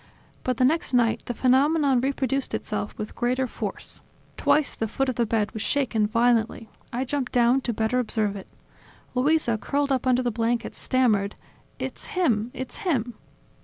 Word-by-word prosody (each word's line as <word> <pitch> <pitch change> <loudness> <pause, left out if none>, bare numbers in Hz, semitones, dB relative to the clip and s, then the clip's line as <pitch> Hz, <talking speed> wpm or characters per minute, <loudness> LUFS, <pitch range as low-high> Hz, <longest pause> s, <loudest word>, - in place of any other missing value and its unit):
But 255 - -1
the 255 - +4
next 305 -1 +1
night, 230 -2 +3
the 245 - -4
phenomenon 270 +1 +3
reproduced 270 0 -1
itself 210 -1 -4
with 215 - -5
greater 250 +2 0
force. - - -2 0.3
Twice 300 -2 +2
the 225 - -2
foot 270 +5 -1
of - - 0
the 235 -2 +1
bed 215 -1 0
was 220 - -5
shaken 230 -7 +1
violently. 230 0 +1 0.2
I 250 +2 -2
jumped 265 -1 -2
down 245 +2 +4
to 245 - -1
better 225 +3 0
observe 215 -4 0
it. 195 - -8 0.7
Luisa, 255 -3 +2
curled 285 +5 -1
up 260 -1 0
under 255 0 +3
the 240 - 0
blankets, 230 +1 -1
stammered: 215 -6 +2 0.4
"It's - - -6
him! 240 - +1
It's 260 -1 -6
him!" 255 - -1
245 Hz, 165 wpm, -25 LUFS, 225-265 Hz, 0.7 s, the